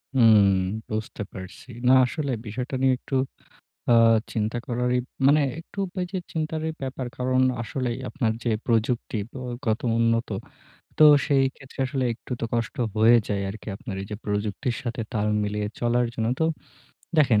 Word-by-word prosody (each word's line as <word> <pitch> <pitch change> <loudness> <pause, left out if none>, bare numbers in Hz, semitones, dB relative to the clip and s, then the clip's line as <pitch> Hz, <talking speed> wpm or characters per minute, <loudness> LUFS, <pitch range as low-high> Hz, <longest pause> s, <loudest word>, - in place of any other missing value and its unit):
হুম। 110 -5 +7 0.4
বুঝতে 110 0 -4
পারছি। 95 +6 -10 0.2
না 130 - +7
আসলে 140 +1 -3
বিষয়টা 125 +5 -4
নিয়ে 130 -1 +4
একটু 135 - -4 0.8
আ - - +7 0.4
চিন্তা 110 +1 -1
করার 125 0 0
ই - - +2 0.3
মানে 150 +2 +6 0.2
একটু 170 - -16 0.2
এই - - -2
যে, 190 - -1
চিন্তারই 160 0 -2
ব্যাপার। 130 -1 -4
কারন 130 0 +2 0.2
আসলেই 120 +1 -3
আপনার 120 -7 0
যে, 120 - +1 0.2
প্রযুক্তি 115 -1 0
ব - - -24 0.3
গত 110 0 +1 0.2
উন্নত 115 +1 +2 0.7
তো 155 - +8 0.2
সেই 140 -2 +4
ক্ষেত্রে 135 0 -11
আসলে 135 -1 -1
একটু 125 - -9 0.2
কষ্ট 115 +1 -2 0.2
হয়ে 115 +2 +7
যায় 100 -1 -1
আরকি 110 +2 -9
আপনার 100 -3 -7
এই - - -7
যে, 105 - -3
প্রযুক্তির 105 +4 -2
সাথে 120 -2 -3
তাল 105 -2 0 0.2
মিলিয়ে 105 0 -1
চলার 120 0 +2
জন্য 110 0 -1
তো। - - +4 0.7
দেখেন, 120 -8 +5
120 Hz, 160 wpm, -25 LUFS, 110-130 Hz, 0.8 s, তো